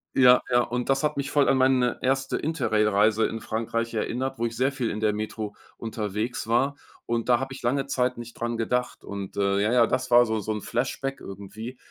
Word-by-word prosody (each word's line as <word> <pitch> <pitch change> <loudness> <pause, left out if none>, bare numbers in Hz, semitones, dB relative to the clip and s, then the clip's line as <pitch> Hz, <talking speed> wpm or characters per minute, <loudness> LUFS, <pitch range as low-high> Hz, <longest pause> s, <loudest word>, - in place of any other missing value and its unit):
Ja, 125 -1 +7
ja, 120 - +5
und 125 +2 -3
das 135 +2 +2
hat 150 - 0
mich 140 0 -2
voll 145 -2 +3
an 135 - +4
meine 130 -2 +3
erste 135 +1 0
Interrail-Reise 110 -7 +2
in 115 -1 -5
Frankreich 115 +1 -2
erinnert, 130 +4 -2
wo 120 - +1
ich 115 - -7
sehr 130 +2 +2
viel 130 -4 -2
in 105 - -4
der 105 -1 +2
Metro 105 0 -4 0.2
unterwegs 110 +1 -3
war. 130 +5 +2 0.3
Und 115 +1 -2
da 120 - +5
habe 135 0 -4
ich 135 - -9
lange 135 +3 0
Zeit 125 -2 0
nicht 120 0 -8
dran 120 0 -3
gedacht. 125 +2 -1
Und, 100 -1 -7
äh, 100 0 +2
ja, 105 +3 +2
ja, 120 -2 +5
das 130 0 -1
war 120 0 +7
so 110 -1 -1
so 110 +1 -3
'n 105 - -3
Flashback 135 +4 -3
irgendwie. 100 +6 -8
120 Hz, 215 wpm, -26 LUFS, 110-130 Hz, 0.3 s, Ja